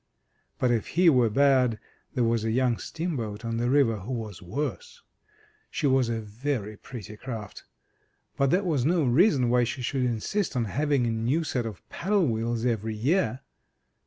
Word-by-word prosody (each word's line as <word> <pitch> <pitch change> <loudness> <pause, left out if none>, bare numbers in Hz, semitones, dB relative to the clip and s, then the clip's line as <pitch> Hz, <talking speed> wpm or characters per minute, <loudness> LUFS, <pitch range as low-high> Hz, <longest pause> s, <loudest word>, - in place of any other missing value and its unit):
But 125 - +2
if 115 -3 0
he 175 -2 +7
were 125 -4 +4
bad 130 -1 +3 0.4
there 125 - +2
was 115 -1 +1
a 110 - 0
young 125 0 +1
steamboat 120 -11 -4
on 115 0 -2
the 120 +1 0
river 130 -5 +3
who 105 +7 -6
was 110 -6 -5
worse. 150 - -5 0.7
She 155 - -3
was 130 -3 +3
a 115 -1 -1
very 110 0 -3
pretty 105 -1 -9
craft, 110 -3 -7 0.7
but 140 -1 +2
that 185 +6 +2
was 150 -8 +1
no 165 +3 +2
reason 135 - +4
why 125 0 +4
she 125 +2 -3
should 130 +2 -1
insist 125 - -1
on 120 -2 +1
having 140 +3 +1
a 115 - 0
new 120 +9 0
set 125 -6 -2
of 105 -4 -9
paddle 195 0 +1
wheels 115 -1 -1
every 110 -2 -1
year. 135 - +1
125 Hz, 175 wpm, -27 LUFS, 115-140 Hz, 0.7 s, he